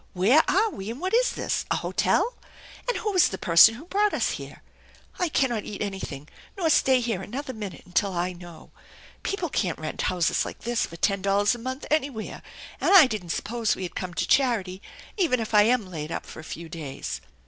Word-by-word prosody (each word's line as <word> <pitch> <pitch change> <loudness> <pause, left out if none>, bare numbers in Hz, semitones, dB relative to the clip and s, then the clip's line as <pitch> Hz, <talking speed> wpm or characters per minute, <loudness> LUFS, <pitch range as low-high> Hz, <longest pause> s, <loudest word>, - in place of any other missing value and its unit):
Where 215 - +5
are 430 +3 +3
we, 195 - -7
and 235 +4 -6
what 370 +4 -3
is - - +3
this? - - -1
A - - +2
hotel? - - +1 0.5
And - - 0
who 425 - -2
was 370 -4 +5
the 190 - -5
person 175 +7 +6
who 280 +8 -11
brought 410 +3 +1
us - - +1
here? - - -8 0.6
I 355 -2 +1
cannot 240 -7 +1
eat 205 - -7
anything 190 -8 -6 0.3
nor 330 -4 +1
stay 265 -3 +4
here 225 -6 -2
another 260 +7 -5
minute 210 -5 -7
until 185 +2 0
I 180 +1 -1
know. 175 -2 -13 0.5
People 390 -3 -2
can't 180 - -1
rent 155 -1 -5
houses 180 -2 +1
like - - -8
this 240 0 -1
for 165 - -11
ten 195 +3 0
dollars 200 +1 +2
a 240 - -6
month 260 +4 -5
anywhere, 280 -7 -1 0.4
and - - +2
I 350 -6 +10
didn't 215 -8 -4
suppose 230 +5 -1
we - - -6
had 180 - -5
come 180 -2 -5
to - - 0
charity, 210 -9 +1 0.4
even 320 - +2
if 225 -1 -4
I 210 0 +7
am 235 -2 +2
laid 160 -4 -6
up - - -4
for - - -10
a - - -9
few 170 0 -6
days." 140 - -6
215 Hz, 210 wpm, -26 LUFS, 180-270 Hz, 0.6 s, I